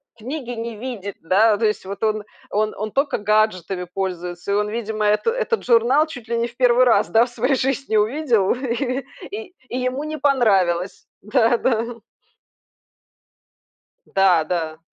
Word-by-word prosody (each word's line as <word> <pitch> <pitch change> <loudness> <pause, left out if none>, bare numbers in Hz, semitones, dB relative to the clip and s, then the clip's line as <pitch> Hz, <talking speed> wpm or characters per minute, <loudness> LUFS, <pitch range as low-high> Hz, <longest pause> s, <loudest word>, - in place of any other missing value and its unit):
книги 250 +3 -6
не 230 -1 -5
видит, 210 -4 -6
да. 205 +6 +3
То 225 - 0
есть 210 -2 -1
вот 200 +2 -6
он 215 -1 0 0.3
он 215 +1 0
он 215 +1 -4
только 275 +4 0
гаджетами 205 -4 0
пользуется. 180 -1 -4
И - - +2
он, 210 0 0
видимо, 220 -1 -2
это, 210 - +2
этот 485 -1 -1
журнал 250 +5 +4
чуть 245 -7 -10
ли 235 - 0
не 235 0 0
в 240 - -15
1 250 0 +5
раз, 240 - +3
да, 225 +1 +4
в - - -10
своей 250 +3 0
жизни 270 -2 -1
увидел, 225 -2 +2
и 255 +1 -2 0.3
и 410 -2 -7 0.2
и 250 - -3
ему 255 +2 -2
не 310 0 -4
понравилось. 195 -10 +2 0.2
Да-да. 230 +1 +1 2.1
Да, 185 -4 +3
да. 160 -1 -3
225 Hz, 155 wpm, -21 LUFS, 205-255 Hz, 2.1 s, 1